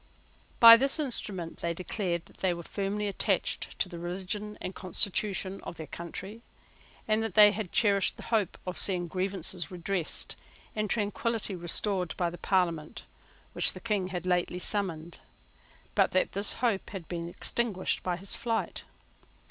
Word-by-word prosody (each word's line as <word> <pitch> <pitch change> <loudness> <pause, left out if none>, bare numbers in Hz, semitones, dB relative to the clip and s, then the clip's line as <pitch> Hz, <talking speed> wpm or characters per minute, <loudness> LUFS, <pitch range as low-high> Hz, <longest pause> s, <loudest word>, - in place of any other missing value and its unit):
By 230 0 +11
this 270 +3 +2
instrument 200 - -4
they 170 0 -2
declared 175 -1 -2
that - - -20
they 185 -2 0
were 170 - -7
firmly 205 +3 -2
attached 200 - -1
to - - 0
the 175 -2 -8
religion 195 +4 -4
and 185 - -5
constitution 195 0 +2
of 170 - -8
their 160 - -6
country, 190 +7 -8 0.7
and 215 0 +2
that 225 - -3
they 210 -1 +9
had 205 -3 -4
cherished 200 -5 +2
the - - -9
hope 210 -5 +1
of 180 0 -4
seeing 180 -3 +1
grievances 185 -1 -1
redressed 180 -1 -3 0.4
and 215 -1 -1
tranquillity 215 -1 -1
restored 180 +1 +1
by 175 -2 0
the 175 - -10
Parliament 170 -5 0 0.5
which - - +2
the - - -8
King 210 -5 -1
had 180 -1 -5
lately 180 0 0
summoned, 180 -4 -2 0.7
but - - +2
that 185 - +2
this 200 +2 +1
hope 230 -5 0
had 185 -5 -7
been 170 -1 -4
extinguished 205 +1 -1
by 180 -1 -2
his 195 +2 -3
flight. 230 -2 -2
190 Hz, 155 wpm, -29 LUFS, 175-210 Hz, 0.7 s, By